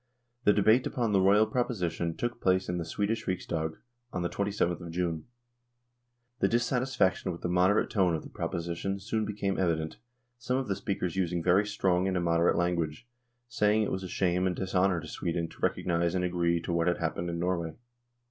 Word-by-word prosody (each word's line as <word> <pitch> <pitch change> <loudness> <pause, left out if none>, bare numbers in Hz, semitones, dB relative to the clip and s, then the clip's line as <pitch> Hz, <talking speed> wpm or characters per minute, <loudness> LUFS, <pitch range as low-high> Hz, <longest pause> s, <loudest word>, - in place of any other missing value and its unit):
The 105 - +7
debate 110 +5 +4
upon 120 -6 -1
the 100 -2 +4
Royal 100 +3 +5
proposition 90 -9 -1
took 120 0 -3
place 95 0 +2
in 90 0 -2
the 85 - -3
Swedish 105 +6 -2
Riksdag 80 -3 -2 0.3
on 90 - -2
the 85 - 0
2/th 100 -4 -1
of 85 - -7
June. 85 -2 -2 1.1
The - - +3
dissatisfaction 120 -5 +1
with 85 - -8
the - - -1
moderate 90 +4 +3
tone 90 -5 +3
of 80 - -4
the - - -10
proposi 85 0 -3
tion 95 +3 -2
soon 110 +2 -1
became 100 -2 -2
evident, 80 -3 0 0.4
some 125 +1 -1
of 135 -1 -2
the 100 - 0
speakers 95 -3 -3
using 90 -2 0
very 95 +4 +4
strong 95 -3 +1
and 95 -1 0
immoderate 85 -1 +2
language, 85 0 -1 0.4
saying 110 -2 +2
it - - -2
was 95 - -2
a 95 - -5
shame 90 0 +1
and 90 - -1
dishonour 95 -1 +1
to 80 - -9
Sweden 85 0 -2
to - - -16
recognise 85 0 +1
and 90 -1 +1
agree 85 -1 +1
to 85 - -3
what 85 0 +1
had 90 - +2
happened 85 +1 -2
in 85 - -3
Norway. 85 -2 -1
90 Hz, 195 wpm, -29 LUFS, 85-100 Hz, 1.1 s, The